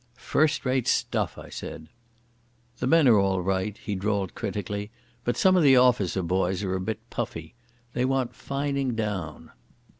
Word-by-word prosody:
"First 145 +4 +1
rate 130 -1 +1
stuff," - - 0
I - - -10
said. 80 - -7 0.9
"The 125 - -1
men 160 0 +5
are 110 -4 +6
all 95 -2 +1
right," 95 +2 -1
he 105 - -5
drawled 100 -1 -1
critically. 105 +1 -4 0.3
"But 120 - -1
some 185 -1 +5
of 180 - +4
the 135 -4 +6
officer 120 -7 +3
boys 95 +2 0
are 95 -1 -1
a 95 - -1
bit 110 0 -4
puffy. 80 -1 -5 0.4
They 125 - +1
want 130 -2 0
fining 140 0 -2
down." 100 -8 -4
105 Hz, 160 wpm, -26 LUFS, 95-130 Hz, 0.9 s, are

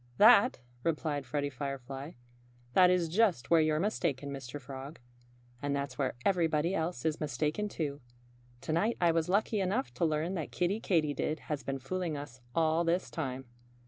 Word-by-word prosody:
"That 220 - +7
" 120 0 -30
replied 150 -4 -1
Freddie 145 +2 -1
Firefly 135 +2 -5 0.6
"that 180 -1 +7
is 180 -2 +2
just 180 - +2
where 165 -1 +7
you're 155 0 +2
mistaken, 155 - -1
Mr. 135 0 -6
Frog. 135 +3 -8 0.6
And 145 0 0
that's 140 -2 -3
where 135 -3 0
everybody 170 -2 +2
else 160 -7 -2
is 160 -1 0
mistaken, 150 +8 -1
too. 145 -6 -3 0.6
To 155 - -2
night 210 +8 +1
I 175 -2 +4
was 165 +1 0
lucky 210 +2 +2
enough 180 - -1
to 125 - 0
learn 155 +3 0
that 165 -5 -4
Kiddie 185 +4 0
Katydid 155 -3 0
has 145 -2 -1
been 135 0 -3
fooling 165 +3 -3
us 135 -3 -9
all 160 0 +3
this 170 +2 0
time." 135 -5 -4
155 Hz, 170 wpm, -31 LUFS, 140-175 Hz, 0.6 s, That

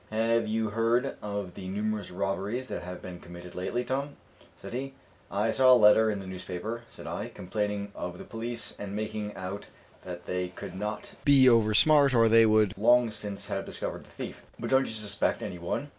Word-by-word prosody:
"Have 115 +1 +1
you 110 0 0
heard 115 +4 +1
of 100 -3 -4
the 95 0 -8
numerous 105 +2 -2
robberies 100 +7 -2
that - - -4
have 90 0 -8
been 90 -1 -7
committed 85 0 -11
lately, 120 +7 -2
Tom?" 140 +3 -3 0.4
said - - -9
he. 135 +2 -4 0.3
"I 105 +3 +1
saw 130 +2 +5
a - - +10
letter 110 -1 +6
in 105 - -1
the 100 - -7
newspaper," 95 +5 -5
said - - -12
I, - - -4
"complaining 105 +1 -3
of 90 0 -5
the - - -8
police, 115 +1 -5
and 100 -1 -5
making 105 -1 -4
out 95 +2 -6 0.4
that 90 -1 -8
they 90 0 -2
could 90 - -9
not 105 +3 -5
be 140 -2 +6
over 110 -3 +5
smart, 145 +1 +6
or 115 -1 +6
they 115 0 +6
would 110 -2 +3
long 120 +1 +5
since 105 -2 -5
have - - -2
discovered - - -4
the - - -19
thief; - - -7 0.2
but - - -4
don't 130 0 +4
you - - -3
suspect 105 -2 -1
any 90 - -5
one?" 85 +12 -3
110 Hz, 200 wpm, -29 LUFS, 95-115 Hz, 0.4 s, a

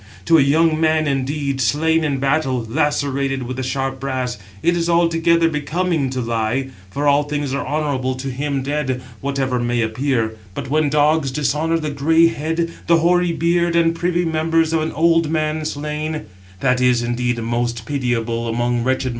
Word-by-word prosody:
To 165 -1 +5
a - - +6
young 155 +3 +3
man, 155 -1 +2
indeed, 140 0 -1
slain 160 +7 +2
in 145 -3 0
battle, 135 -3 0
lacerated 140 -1 0
with 125 +1 -5
the - - -2
sharp 135 +1 -2
brass, 130 -4 -3 0.2
it 175 - +3
is 170 0 -1
altogether 170 0 +3
becoming 160 -1 -1
to 130 -1 -3
lie, 115 +3 -1 0.2
for 145 +9 -2
all 145 0 +4
things 145 -2 -3
are 140 +1 -1
honourable 140 -4 -1
to 135 +1 -5
him 140 +1 -2
dead, 135 -3 -2 0.2
whatever 135 -2 -1
may 120 0 0
appear; 115 -1 -1 0.2
but 130 - -5
when 155 -1 +2
dogs 150 0 +2
dishonour 150 +4 0
the 155 -2 -3
grey 160 +4 +3
head, 165 +2 -2
the 170 - +5
hoary 175 +1 +2
beard, 170 +1 +1
and 165 -1 +3
privy 175 +1 0
members 160 0 +1
of 160 - +2
an 155 - -2
old 165 -1 +3
man 155 -1 -1
slain, 150 +1 -3 0.4
that 125 -1 +2
is 125 -1 +3
indeed 120 0 -1
most 120 0 -2
pitiable 120 -3 -1
among 120 +1 0
wretched 130 +2 0
mortals." 130 - -1
145 Hz, 175 wpm, -20 LUFS, 130-160 Hz, 0.4 s, a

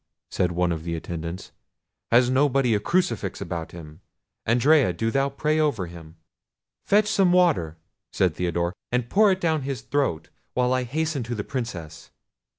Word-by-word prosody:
said 90 -1 0
one 90 0 0
of 80 -1 -3
the 85 0 -3
attendants; 85 +1 -6 0.6
"has 120 +1 +5
nobody 130 -2 +2
a 105 - +2
crucifix 120 - -1
about 85 -2 -5
them? 80 0 -12 0.5
Andrea, 125 - +4
do 115 +6 -1
thou 135 +2 +1
pray 150 +3 0
over 145 -12 +1
him." 85 -2 -12 0.7
"Fetch 210 +1 +3
some 195 -3 +3
water," 160 - +2 0.3
said - - +1
Theodore, 85 0 -1 0.2
"and 125 -1 -1
pour 210 0 +5
it 190 - 0
down 160 -4 +1
his 135 -3 -4
throat, 130 - -1 0.3
while 125 0 +2
I 130 -1 0
hasten 155 +2 -2
to 120 +1 -4
the 105 - -3
Princess." 90 - -6
120 Hz, 160 wpm, -24 LUFS, 85-145 Hz, 0.7 s, has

